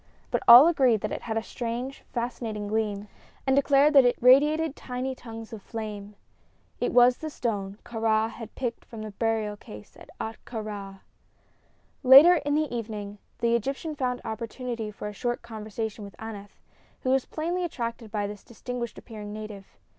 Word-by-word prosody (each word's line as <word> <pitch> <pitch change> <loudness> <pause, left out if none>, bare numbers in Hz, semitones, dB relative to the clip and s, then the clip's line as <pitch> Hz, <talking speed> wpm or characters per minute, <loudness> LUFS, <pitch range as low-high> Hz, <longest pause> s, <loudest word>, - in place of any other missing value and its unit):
But - - +1
all 245 +6 +11
agreed 260 -10 +3
that - - -3
it - - -4
had 225 -1 -3
a 225 - -1
strange, 245 +3 -5
fascinating 230 -3 -3
gleam, 210 -1 -1 0.4
and 265 -1 +3
declared 280 +2 +4
that 275 -2 +8
it 245 0 +2
radiated 295 +4 +5
tiny 255 +1 -4
tongues 225 -3 -10
of 215 - -7
flame. 210 -2 -7 0.6
It - - 0
was 245 0 +6
the 315 - -5
stone 205 -8 -3
Kāra 225 -1 +1
had 230 -2 -10
picked 240 -3 -3
from 220 -2 -9
the 215 - -6
burial 220 0 -1
case 105 - -13
of - - -15
Ahtka 225 +1 -6
Rā. 195 -2 -7 1.0
Later 290 +7 +9
in 290 -1 -1
the 300 -5 0
evening 210 -3 -5 0.2
the 235 0 +2
Egyptian 275 +7 -2
found 250 -3 -2
opportunity 230 0 -4
for 210 0 -7
a 210 - -6
short 240 +4 -3
conversation 220 -1 -5
with 200 - -10
Aneth, 205 -3 -9 0.4
who 255 - 0
was 265 -1 +2
plainly 345 +3 -2
attracted 235 -8 -4
by 210 -2 -1
this 205 0 -7
distinguished 240 0 -6
appearing 210 -2 -9
native. 210 -2 -9
230 Hz, 170 wpm, -27 LUFS, 210-255 Hz, 1.0 s, all